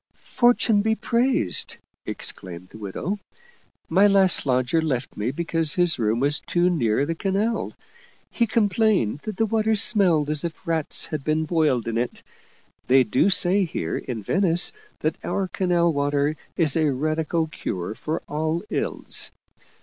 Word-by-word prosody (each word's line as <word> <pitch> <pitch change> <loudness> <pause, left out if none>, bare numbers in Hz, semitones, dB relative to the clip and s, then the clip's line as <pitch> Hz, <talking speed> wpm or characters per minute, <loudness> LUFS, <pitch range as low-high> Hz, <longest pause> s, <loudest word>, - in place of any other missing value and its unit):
" - - -47 0.2
Fortune 240 -4 +4
be 220 +1 +1
praised! 235 - 0
" - - -51
exclaimed 90 -1 -4
the 110 - -13
widow. 150 - -4 0.4
" - - -37
My 200 +2 +7
last 195 -6 +4
lodger 130 +5 +2
left 135 -5 -2
me 105 +3 -2
because 165 +1 -1
his 175 -6 +2
room 110 +1 +1
was 145 +3 +1
too 175 +1 +1
near 125 -5 +1
the 165 - -2
canal; 200 +6 -1 0.6
he 235 - +1
complained 210 - +1
that 215 +4 -7
the 225 - +2
water 220 0 +1
smelled 185 -8 +3
as 150 -1 0
if 170 +2 -6
rats 165 -3 0
had 150 -3 -5
been 155 +1 0
boiled 150 -8 +1
in 115 0 -1
it. 120 - -4 0.6
They 130 +1 +5
do 125 - +2
say 195 0 +2
here 120 - -3
in 115 -4 -6
Venice 175 - +2 0.3
that - - -2
our 195 -1 -1
canal 175 -2 +1
water 145 +1 0 0.2
is 155 -5 +3
a 155 -3 +2
radical 155 +4 -1
cure 95 - -5
for 155 +8 -4
all 155 +3 -2
ills. - - 0
160 Hz, 160 wpm, -23 LUFS, 135-195 Hz, 0.6 s, My